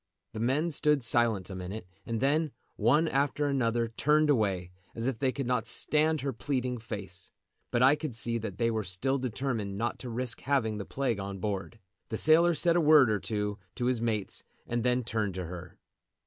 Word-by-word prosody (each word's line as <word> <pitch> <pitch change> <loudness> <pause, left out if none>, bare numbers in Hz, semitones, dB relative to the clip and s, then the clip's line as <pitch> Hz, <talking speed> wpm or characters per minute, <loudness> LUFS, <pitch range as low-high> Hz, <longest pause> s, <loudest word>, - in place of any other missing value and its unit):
The 110 - -5
men 140 +9 +1
stood 150 -2 +2
silent 115 -5 +2
a - - -5
minute, 95 +3 -6 0.2
and 115 -1 -1
then, 150 +4 +2 0.3
one 135 +10 +3
after 145 +1 +1
another, 120 -4 +1
turned 150 +6 +3
away, 95 -8 0 0.2
as 115 - -3
if 130 -3 -1
they 130 +1 +2
could 135 0 -4
not 120 -1 0
stand 155 +5 +1
her 135 0 -2
pleading 125 0 -2
face. 100 -5 -7 0.4
But 120 +1 +2
I 135 +3 +7
could 150 -5 -5
see 115 +1 0
that 105 -4 -6
they 115 +1 +1
were 110 -1 -1
still 115 +9 -1
determined 115 -5 -2
not 115 +3 -2
to 125 - -6
risk 120 0 -2
having 115 -6 0
the 100 - -5
plague 130 -6 -1
on 100 0 -5
board. 100 +2 -4 0.3
The 110 - -2
sailor 165 +4 +5
said 170 +1 +3
a 175 - +4
word 150 -6 +6
or 105 - +1
two 105 0 -2 0.2
to 125 - -2
his 125 -2 +1
mates 110 -4 -2 0.2
and 120 0 -1
then 125 +1 +1
turned 110 -5 -2
to 90 -1 -3
her. 90 0 -9
120 Hz, 200 wpm, -29 LUFS, 105-140 Hz, 0.4 s, I